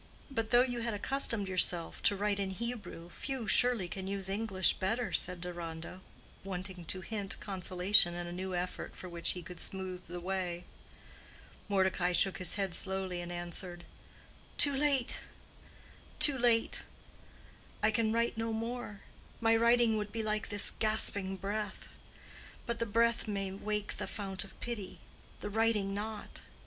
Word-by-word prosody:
"But 225 -4 -1
though 245 +1 +7
you 245 -2 -2
had 230 -2 -1
accustomed 230 -2 +1
yourself 180 -2 +1
to 205 - -2
write 205 0 0
in 195 -1 0
Hebrew, 205 -5 -5
few, 260 0 -4
surely, 245 -7 +4
can 190 +1 -5
use 195 -1 -1
English 195 -2 +3
better," 225 +5 0
said 180 -1 +2
Deronda, 170 0 -6 0.4
wanting 185 -2 -5
to 185 +3 -1
hint 200 0 -2
consolation 185 -1 +4
in 175 0 -3
a 175 - -6
new 185 +1 -3
effort 180 +1 -3
for 185 - -8
which 170 -1 +1
he 180 - -6
could 180 +2 -9
smooth 185 -1 -4
the 175 +1 -5
way. 180 -1 -2 1.1
Mordecai 190 -2 +2
shook 195 +2 +4
his 185 - -1
head 195 -3 -1
slowly, 190 -1 -1
and 175 0 -6
answered, 175 0 -4 0.7
"Too 285 -1 +5
late—too 280 +1 -1
late. 235 -2 +3 1.0
I 215 - +5
can 220 0 +2
write 230 0 +1
no 225 0 -1
more. 225 -2 -4 0.4
My 225 0 +4
writing 235 -1 +5
would 210 0 -4
be 225 0 -2
like 215 0 -1
this 205 -1 0
gasping 205 -3 +1
breath. 205 +1 -3 0.8
But 235 0 -2
the 230 - 0
breath 230 +2 +2
may 195 -2 -2
wake 210 +1 -3
the - - -3
fount 195 -3 -3
of 195 - -13
pity—the 210 -2 -7
writing 215 -2 +2
not. 210 +1 -5
200 Hz, 150 wpm, -33 LUFS, 185-225 Hz, 1.1 s, though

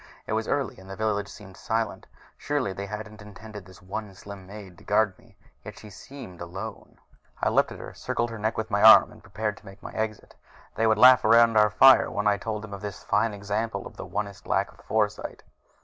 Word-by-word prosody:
It - - -4
was 110 0 -1
early 140 -8 -2
and 95 0 -14
the 95 - -6
village 105 -1 -1
seemed 95 -2 -13
silent 115 +2 -3 0.3
surely 145 -9 -2
they 100 +1 -6
hadn't 105 +1 -8
intended 105 0 -11
this 95 0 -16
one 100 +1 -6
slim 100 -1 -11
maid 100 -3 -11
to - - -17
guard 105 -1 +2
me! 115 -4 -23 0.3
Yet - - -10
she 105 - -12
seemed 95 -5 -11
alone. 95 +6 -8 0.4
I - - +1
leaped - - +2
at - - -8
her, - - -9
circled 120 0 -3
her 115 - -7
neck 110 +2 -2
with 110 0 -4
my 100 0 +1
arm, 110 - +7
prepared 105 +1 -4
to - - -18
make 95 +1 -13
my - - -7
exit. 110 -1 -4 0.4
They 115 +1 +1
would 110 -1 +3
laugh 125 +2 +7
around 115 +1 +5
our 105 0 +5
fire 135 +7 +6
when 105 - -3
I 105 -1 +3
told 105 +1 -5
them 110 -2 -9
of 100 - -7
this 105 -1 -7
fine 110 +2 +1
example 105 +1 -3
of - - -11
the - - -8
Onist 100 -2 -5
lack - - 0
of - - -21
foresight.... - - -2
105 Hz, 220 wpm, -26 LUFS, 100-110 Hz, 0.4 s, arm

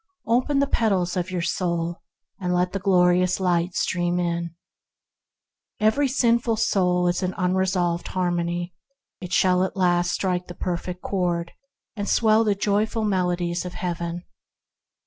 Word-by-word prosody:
Open 250 +5 +1
the 280 - +3
petals 195 -9 +1
of 180 0 -2
your 180 -2 -2
soul 170 -1 -2 0.4
and 180 -2 -1
let 180 0 +1
the 195 - -1
glorious 180 -1 +3
Light 175 -1 0
stream 175 0 0
in. 170 -1 -2 1.2
Every 220 +7 +3
soul 225 -8 +2
is 175 +2 0
a 185 - 0
resolved 180 -1 0
harmony. 175 -1 -2 0.5
It 180 -1 -8
shall 185 0 +3
at 190 - -3
last 175 -1 +2
strike 180 -1 -1
the 175 - -9
Perfect 180 0 -4
Chord, 175 -3 -1 0.4
and 205 -2 -3
swell 220 -1 +4
the 210 -2 +1
joyful 210 +3 0
melodies 180 -3 0
of 180 -1 -7
Heaven. 175 -2 -4
180 Hz, 135 wpm, -24 LUFS, 175-200 Hz, 1.2 s, swell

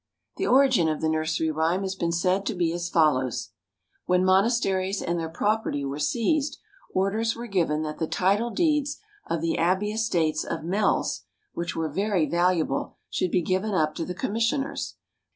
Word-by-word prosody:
= - - -47
The 385 - -1
origin 260 -10 +4
of 155 - -1
the 160 - 0
nursery 160 0 0
rhyme 165 +5 0
has 190 0 -2
been 170 -3 -1
said 180 +3 +1
to 225 - -1
be 170 -2 0
as 175 0 -3
follows: 130 -7 +1 0.6
When 180 0 +3
monasteries 195 -1 +2
and 170 0 -1
their 165 -1 -3
property 205 -5 -1
were 140 +2 -4
seized, 275 - 0 0.3
orders 215 +4 0
were 235 - -6
given 165 -8 0
that 155 0 -5
the 160 - -1
title 200 +8 +1
deeds 295 -1 +1 0.3
of 165 -2 -1
the 165 0 0
abbey 190 +5 +1
estates 170 -9 0
of 165 - -4
Mells, 195 +5 0 0.3
which 170 0 -3
were 160 -1 -1
very 190 +1 0
valuable, 170 -5 0 0.2
should 185 - 0
be 175 - +1
given 190 +4 0
up 155 -3 +2
to 165 - -3
the 180 +2 -5
commissioners. 230 +6 -1
180 Hz, 175 wpm, -26 LUFS, 160-215 Hz, 0.6 s, origin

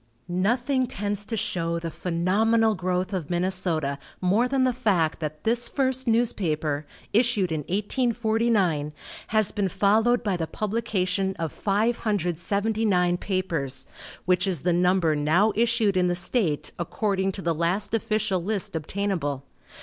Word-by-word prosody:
Nothing 240 +9 +1
tends 205 -3 -3
to 225 +1 -3
show 170 -3 -1
the 165 -1 -4
phenomenal 210 +7 +2
growth 185 0 -2
of 175 -6 -3
Minnesota 175 -5 +2 0.2
more 200 +7 +2
than 265 0 +1
the 255 -1 +2
fact 195 -10 +1
that 155 -1 -5
this 235 +1 0
first 260 -2 -1
newspaper, 155 -11 0 0.3
issued 220 -5 +2
in 160 - -1
1849, 215 - 0 0.3
has 215 -2 +1
been 200 -3 -1
followed 220 +6 +2
by 200 -4 0
the 165 -2 -2
publication 195 -3 -1
of 165 -3 -3
579 200 -2 0
papers, 155 -9 -1 0.4
which 180 +1 +2
is 175 -7 0
the 175 0 +1
number 180 -2 +2
now 160 +9 +2
issued 225 -3 +2
in 180 -1 +3
the 175 - +1
state 175 - 0
according 195 +2 -1
to 190 - -7
the 170 - +1
last 175 +7 -1
official 215 -4 0
list 200 -3 -2
obtainable. 160 -5 -2
190 Hz, 135 wpm, -25 LUFS, 170-220 Hz, 0.4 s, in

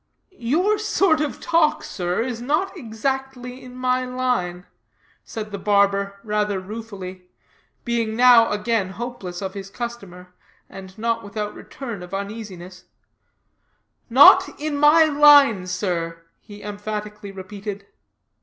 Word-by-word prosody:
"Your 355 - +1
sort 390 -6 +2
of 300 - -3
talk, 330 -2 +2
sir, 180 +3 -2
is 240 -2 -5
not 330 +10 -1
exactly 255 - -4
in 250 0 -11
my 255 0 0
line," 250 -9 -2 0.6
said 215 -1 -7
the 200 - -5
barber, 200 0 +1
rather 210 -2 -1
ruefully, 190 -3 -8 0.6
being 230 -2 -1
now 240 -1 +6
again 210 -2 -1
hopeless 205 -7 -6
of 190 0 -4
his 195 -1 -7
customer, 195 -6 -8 0.3
and 190 0 -12
not 230 0 -1
without 210 +1 -5
return 235 -8 -8
of 180 +2 -7
uneasiness; 195 -3 -7 1.2
"not 260 +5 +7
in 300 0 -2
my 295 +3 +6
line, 285 -10 +6
sir," 170 -3 -3 0.2
he 205 -1 -13
emphatically 210 0 -6
repeated. 200 +1 -7
215 Hz, 120 wpm, -22 LUFS, 195-255 Hz, 1.2 s, not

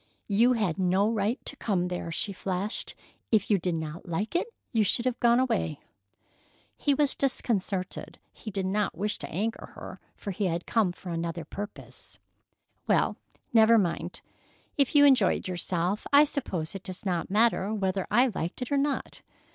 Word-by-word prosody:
"You 230 +5 +4
had 200 -8 0
no 190 +2 +3
right 220 +2 0
to - - -1
come 185 -8 0
there!" 180 -2 -4
she 200 +4 -2
flashed. 190 +3 -3 0.4
"If 215 -1 +2
you 200 - +4
did 175 0 -1
not 160 +2 -5
like 200 - -2
it, 350 - +1 0.3
you 225 -2 +4
should 235 +4 +1
have 255 -1 0
gone 235 0 +4
away." 225 - 0 1.0
He 285 - +1
was 285 -1 +2
disconcerted. 200 -8 -2 0.2
He 220 - -8
did 195 -2 -2
not 200 -2 0
wish 210 +3 -1
to - - -6
anger 215 +7 -3
her, - - -9 0.2
for 200 - -5
he 195 +1 -1
had 170 0 -2
come 215 -6 +2
for 175 0 -8
another 165 0 -3
purpose. 205 +6 -9 0.7
"Well, - - +3 0.4
never 225 0 +7
mind. 185 -6 -1 0.5
If 280 0 +1
you 290 0 +8
enjoyed 255 -12 +4
yourself, 180 +2 -1
I 285 +1 +8
suppose 190 - -3
it 195 - -6
does 185 +2 -8
not 175 -3 -1
matter 210 -1 +3
whether 195 -3 -1
I 245 +3 +4
liked 175 +8 -3
it 250 - -8
or 285 - +3
not. 280 0 -1
200 Hz, 170 wpm, -28 LUFS, 180-235 Hz, 1.0 s, you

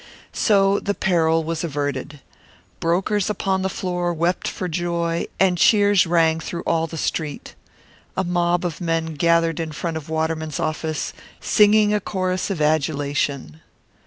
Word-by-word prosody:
So 200 -2 +3
the 205 - -2
peril 165 -3 +2
was 165 +1 -3
averted. 145 -2 -3 0.6
Brokers 190 +4 0
upon 190 -2 -1
the 190 - -1
floor 180 -2 -2
wept 170 +3 0
for 185 - -3
joy, 170 0 -1
and 185 -2 +3
cheers 205 -3 +5
rang 165 -1 +3
through 170 +1 -5
all 165 0 0
the 165 - -8
Street. 155 -1 -3 0.6
A 190 - +1
mob 175 0 0
of 170 0 -4
men 165 -1 -1
gathered 165 +1 +2
in 160 -1 -3
front 160 +2 -3
of 160 0 -9
Waterman's 160 -1 -2
office, 155 0 -2 0.3
singing 210 0 +4
a 210 - +2
chorus 185 -2 -2
of 190 -5 -3
adulation. 145 - -1
170 Hz, 145 wpm, -22 LUFS, 160-185 Hz, 0.6 s, cheers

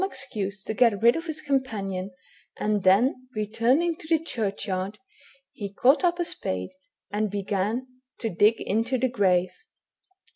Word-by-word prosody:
excuse 215 - -4
to 220 - -3
get 220 -2 +3
rid 235 +1 +6
of 330 +1 -4
his 310 -1 -4
companion, 210 -10 -2 0.5
and 210 -1 0
then 240 +8 +3
returning 235 +11 +1
to 330 -1 -12
the 325 0 +4
churchyard, 200 - -3 0.5
he 200 -2 -6
caught 260 - +4
up 345 -1 +3
a 345 - 0
spade 95 - -3 0.4
and 210 +1 0
began 205 +4 -1 0.3
to 230 - -3
dig 210 +3 +3
into 230 +5 0
the 260 - +2
grave. 185 -6 +2
220 Hz, 145 wpm, -26 LUFS, 200-260 Hz, 0.5 s, rid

